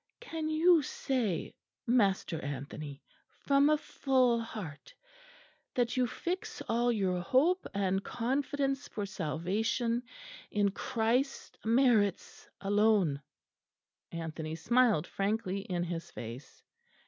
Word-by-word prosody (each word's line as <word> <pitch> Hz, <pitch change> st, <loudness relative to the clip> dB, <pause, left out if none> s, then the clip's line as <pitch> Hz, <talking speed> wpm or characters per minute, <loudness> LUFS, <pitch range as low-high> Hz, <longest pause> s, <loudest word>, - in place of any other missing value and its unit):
"Can 325 Hz, -10 st, -4 dB
you 325 Hz, +1 st, +5 dB
say, 240 Hz, -, -2 dB, 0.3 s
Master 200 Hz, -, +2 dB
Anthony, 140 Hz, +1 st, -6 dB, 0.4 s
from 280 Hz, +1 st, +5 dB
a 305 Hz, -, +4 dB
full 255 Hz, -5 st, +2 dB
heart, 215 Hz, -, -8 dB, 0.8 s
that 245 Hz, -2 st, +1 dB
you 250 Hz, -1 st, +2 dB
fix 370 Hz, -, -4 dB
all 240 Hz, +1 st, +2 dB
your 190 Hz, -5 st, 0 dB
hope 310 Hz, -, +2 dB
and 195 Hz, -1 st, +1 dB
confidence 275 Hz, +3 st, -1 dB
for 205 Hz, -, -4 dB
salvation 200 Hz, -, -1 dB, 0.5 s
in 205 Hz, -1 st, +2 dB
Christ's 235 Hz, +7 st, 0 dB
merits 225 Hz, -4 st, +2 dB
alone?" 205 Hz, -7 st, +3 dB, 0.9 s
Anthony 160 Hz, -1 st, -4 dB
smiled 235 Hz, -3 st, +3 dB
frankly 200 Hz, 0 st, -1 dB
in 180 Hz, -3 st, -2 dB
his 170 Hz, -1 st, -4 dB
face. 115 Hz, +4 st, -9 dB
220 Hz, 100 wpm, -31 LUFS, 180-260 Hz, 0.9 s, you